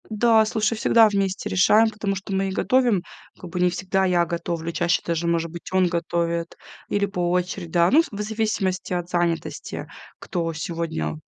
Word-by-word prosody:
Да, 220 0 +4
слушай, 215 +1 0
всегда 225 0 +5
вместе 195 -2 -1
решаем, 210 +4 +4
потому 210 -2 -3
что 195 +1 -6
мы 195 0 0
и - - -4
готовим, 240 -2 +2 0.4
как 180 - -9
бы 180 - -3
не 180 0 +4
всегда 185 +2 -1
я 175 -2 +2
готовлю, 170 0 -3
чаще 170 +2 +1
даже, 170 0 -1
может 165 -1 0
быть, 170 0 -9
он 185 -1 +3
готовит 170 0 -2 0.3
или 205 0 +1
по 180 -3 -2
очереди, 180 0 -2
да. 170 +1 +3
Ну, 300 - +6
вз - - -7
в 205 -1 -5
зависимости 210 -4 -2
от 175 -1 -3
занятости, 175 -2 -2 0.3
кто 170 -2 -3
сегодня, 155 - -3
180 Hz, 180 wpm, -23 LUFS, 170-205 Hz, 0.4 s, Ну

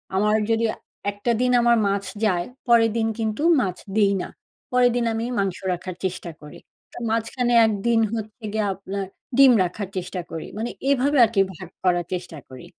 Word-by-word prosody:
আমার 210 +2 +3 0.2
যদি 225 0 +2 0.5
একটা 205 +4 -2
দিন 250 0 +2
আমার 235 0 +4
মাছ 200 0 0 0.2
যায়, 175 -4 +1 0.2
পরের 230 -2 +5
দিন 225 -1 +1
কিন্তু 220 +2 -2 0.2
মাছ 185 -5 -2 0.2
দিই 205 -2 +4
না। - - -6 0.4
পরের 250 0 +4
দিন 240 -1 +1
আমি 225 +1 -2
মাংস 195 -2 -1 0.2
রাখার 180 +1 -6
চেষ্টা 180 -2 -4
করি। 150 0 -11 0.5
মাঝখানে 230 +2 0
একদিন 220 +2 +1
হচ্ছে 220 0 -6
গিয়ে 215 -1 0
আপনার 195 +1 -5 0.3
ডিম 275 -1 +8
রাখার 185 +3 -4
চেষ্টা 180 0 -4
করি 160 - -6
মানে 225 +2 -2 0.2
এভাবে 280 +1 +2
আরকি 215 -3 +1
ভাগ 185 0 -10
করার 175 -2 +2
চেষ্টা 175 -2 -5
করি। 130 +4 -11
210 Hz, 170 wpm, -23 LUFS, 185-230 Hz, 0.5 s, ডিম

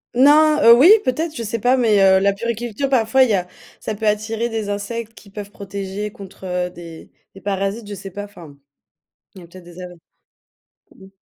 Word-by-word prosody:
Non, 300 +4 +5
heu, 230 - +9
oui 265 +9 +6 0.2
peut-être, 315 +5 -2
je 235 - -5
sais 225 +1 -4
pas 250 +4 +2
mais 220 -5 +2
heu, 190 -1 +5
la 200 +1 +2
puériculture 235 +4 -4
parfois 260 0 +3
il 255 - +1
y - - +2
a 180 -2 -1 0.3
ça 220 - -5
peut 215 +1 -4
attirer 215 +2 -1
des 220 -3 -4
insectes 220 +3 -5
qui 210 - -17
peuvent 205 0 -9
protéger 200 +1 -6
contre, 195 -1 -13
heu, 180 -1 -2
des 170 -2 -12 0.2
des 195 - -13
parasites, 200 +2 -3
je 205 - -7
sais 195 0 -8
pas 205 +3 -7
enfin. 175 -8 -13 0.8
Il 190 - -12
y - - -13
a - - -15
peut-être 185 +1 -14
des 175 +1 -13
a - - -6 1.1
ou. 190 0 -17
205 Hz, 210 wpm, -19 LUFS, 195-235 Hz, 1.1 s, heu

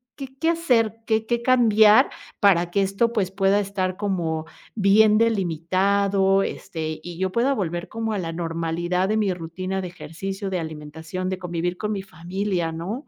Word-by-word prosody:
qué 270 -2 -6
qué 325 - +2
hacer, 245 -10 +2
qué 220 0 +1
qué 235 +1 -1
cambiar 220 -4 +5 0.3
para 175 -4 +4
que 200 - +2
esto, 200 +5 +1
pues, 190 -4 0
pueda 195 +1 +2
estar 190 -2 -2
como 170 -6 -2 0.3
bien 210 +1 +5
delimitado, 195 0 +2
este, 155 -1 -5
y 175 -1 -8
yo 190 0 -1
pueda 250 +6 +2
volver 175 -3 -3
como 225 -1 -3
a 200 - -1
la 165 -2 -4
normalidad 170 +2 -1
de 215 - +1
mi 200 -4 +1
rutina 185 +3 -4
de 180 - -4
ejercicio, 195 +3 -6
de 180 - -1
alimentación, 160 +3 -6
de 190 0 -3
convivir 175 0 -3
con 210 0 -3
mi 195 -2 -3
familia, 180 0 -3
no? 190 - -5
190 Hz, 170 wpm, -23 LUFS, 175-210 Hz, 0.3 s, cambiar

